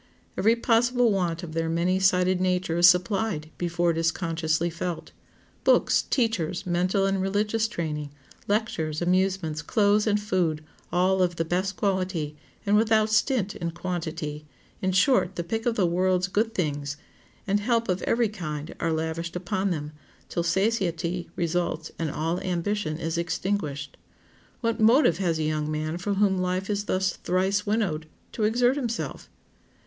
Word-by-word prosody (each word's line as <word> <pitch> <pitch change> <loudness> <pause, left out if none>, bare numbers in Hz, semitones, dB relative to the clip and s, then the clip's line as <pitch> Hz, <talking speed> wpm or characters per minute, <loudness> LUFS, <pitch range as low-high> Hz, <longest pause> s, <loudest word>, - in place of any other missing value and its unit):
Every 225 +3 +3
possible 235 0 +3
want 175 -3 -1
of 160 -2 -7
their 165 0 -1
many 175 +3 +1
sided 185 -1 +3
nature 180 -2 0
is 175 +1 +9
supplied 180 -2 0
before 175 0 +1
it 165 - -2
is 165 0 +2
consciously 165 -1 -1
felt. 165 0 -5 0.5
Books, - - +4
teachers, 220 - 0
mental 180 +2 +1
and 195 -1 +1
religious 210 +3 0
training, 150 -8 -4 0.4
lectures, 180 -8 -1
amusements, 185 -3 +1
clothes, 210 +4 +2
and 210 -1 +3
food, 180 -6 0 0.3
all 185 +2 +2
of 175 -1 +1
the 165 - -1
best 185 +3 -1
quality, 185 -7 -1 0.3
and 205 +1 +3
without 220 0 +3
stint 215 -2 +1
in 170 - -3
quantity—in 165 0 -5
short, 190 -1 +3
the 170 - -2
pick 225 +7 -3
of 235 - +1
the 195 - +2
world's 180 +1 +1
good 220 +3 0
things—and 150 +5 -3
help 230 +2 +1
of 180 -1 0
every 235 0 +2
kind 155 -7 -5
are 165 - 0
lavished 160 +1 -3
upon 185 +2 -1
them, 150 -4 -3 0.4
till 170 - -1
satiety 175 -2 0
results, 170 -2 -1
and 165 -2 -1
all 165 +4 -1
ambition 180 -2 -2
is 165 0 -2
extinguished. 165 -5 -2 0.6
What 230 -1 0
motive 220 - +5
has 170 -4 +1
a 160 - -1
young 155 0 -1
man 155 +2 -2
for 200 +3 -1
whom 195 -2 +2
life 185 +2 -1
is 205 0 -1
thus 185 -1 +1
"thrice 190 +3 0
winnowed" 190 -8 0 0.2
to 215 - -1
exert 245 +4 +3
himself? 235 -4 -4
180 Hz, 155 wpm, -26 LUFS, 165-205 Hz, 0.6 s, is